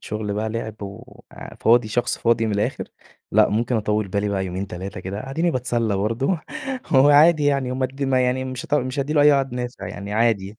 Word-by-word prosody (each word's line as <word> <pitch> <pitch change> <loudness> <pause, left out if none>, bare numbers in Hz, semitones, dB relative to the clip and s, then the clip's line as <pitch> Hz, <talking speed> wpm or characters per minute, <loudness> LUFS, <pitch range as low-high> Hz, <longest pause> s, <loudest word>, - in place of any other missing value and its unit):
شغل 105 -1 -4
بقى 105 +2 -2
لعب 110 -1 -5
و 100 0 -10 0.3
وفاضي 115 0 +3
شخص 120 +3 -1
فاضي 115 -1 +2
من 110 - -1
الآخر، 100 +1 -1 0.5
لأ - - +5
ممكن 115 +3 0
أطَوِّل 105 -1 -1
بالي 100 +2 -1
بقى 95 -1 -1
يومين 95 +2 -4
3 95 0 -7
كده 100 +8 -6
أدِيني 165 +5 0
بتسلّى 120 -6 -1
برضه 115 - 0 0.5
هو 135 0 +5
عادي 150 +1 +6
يعني 140 -3 +1
وما 130 0 0
د 135 +2 -8
ما 135 -1 +2
يعني 125 +1 0
مش 130 -1 -6
هت - - -1
مش 130 0 -1
هادّي 140 +2 -1
له 150 - +3
أي 150 0 +7
عُقاد 135 -2 0
نافع 125 0 -5
يعني 100 +1 -7
عادي. 110 -2 0
115 Hz, 210 wpm, -22 LUFS, 105-135 Hz, 0.5 s, أي